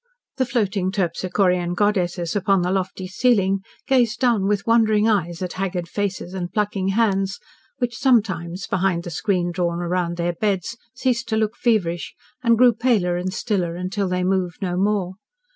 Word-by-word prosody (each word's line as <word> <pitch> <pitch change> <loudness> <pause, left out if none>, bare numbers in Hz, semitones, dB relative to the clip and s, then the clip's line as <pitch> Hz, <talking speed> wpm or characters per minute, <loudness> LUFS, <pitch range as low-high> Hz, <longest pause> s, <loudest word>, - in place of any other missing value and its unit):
The 260 -2 +1
floating 200 -6 0
Terpsichorean 180 -1 0
goddesses 180 -4 0
upon 195 -2 +2
the 180 - 0
lofty 190 0 -2
ceiling 195 -2 +2 0.3
gazed 240 -4 +2
down 230 -6 +2
with 205 -1 0
wondering 220 -2 +3
eyes 180 -5 0
at 180 - -4
haggard 180 -2 -3
faces 190 -1 -3
and 180 -2 -4
plucking 205 -3 -1
hands 195 -2 +1 0.4
which 245 -3 -2
sometimes, 195 - +1
behind 185 -2 0
the 175 - -6
screen 175 +1 0
drawn 175 -1 -1
round 175 0 -1
their 175 0 0
beds, 195 +2 -1 0.2
ceased 250 -1 0
to 220 - +1
look 215 -1 0
feverish, 180 -8 0 0.3
and 235 -2 +3
grew 245 0 +6
paler 215 -7 +1
and 180 +1 -2
stiller, 185 -3 -1
until 185 +3 -2
they 180 0 -1
moved 185 -2 0
no 180 -3 -2
more. 190 -1 0
190 Hz, 160 wpm, -22 LUFS, 180-215 Hz, 0.4 s, grew